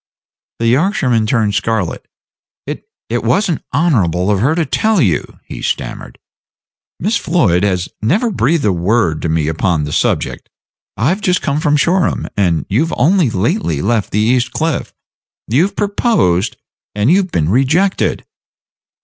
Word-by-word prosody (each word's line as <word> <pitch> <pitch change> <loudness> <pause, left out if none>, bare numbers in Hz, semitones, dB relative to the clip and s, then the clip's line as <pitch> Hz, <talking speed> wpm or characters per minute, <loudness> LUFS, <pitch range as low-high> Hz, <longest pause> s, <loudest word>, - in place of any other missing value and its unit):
The 115 - -2
Yorkshireman 125 - +1
turned 110 -4 +1
scarlet. 105 -4 -2 0.6
"It - - -7 0.2
it 120 +1 -2
was 155 - +1
n't 160 - -3
honorable 105 - +1
of 100 - +1
her 135 +9 +2
to 165 -2 0
tell 215 - +1
you," 95 - 0
he - - -8
stammered. - - -4 0.8
"Miss 210 +6 0
Floyd 115 - +1
has 90 -3 0
never 200 - +1
breathed 150 - +1
a 100 - +3
word 90 -2 0
to 85 - -2
me 80 -1 0
upon 80 0 0
the 75 - -4
subject. - - -1 0.5
I've 160 - 0
just 180 -4 0
come 140 0 0
from 150 -2 +2
Shoreham, 175 +4 +1
and 85 -5 +1
you've 145 +12 0
only 165 +2 +3
lately 100 - -1
left 110 0 0
the - - -2
East 120 +3 +1
Cliff. 160 -3 -2 0.6
You've 160 - +1
proposed, 200 - +1 0.4
and 105 +7 +2
you've 190 +1 +2
been 80 - 0
rejected." 150 - +1
120 Hz, 150 wpm, -15 LUFS, -, 0.8 s, a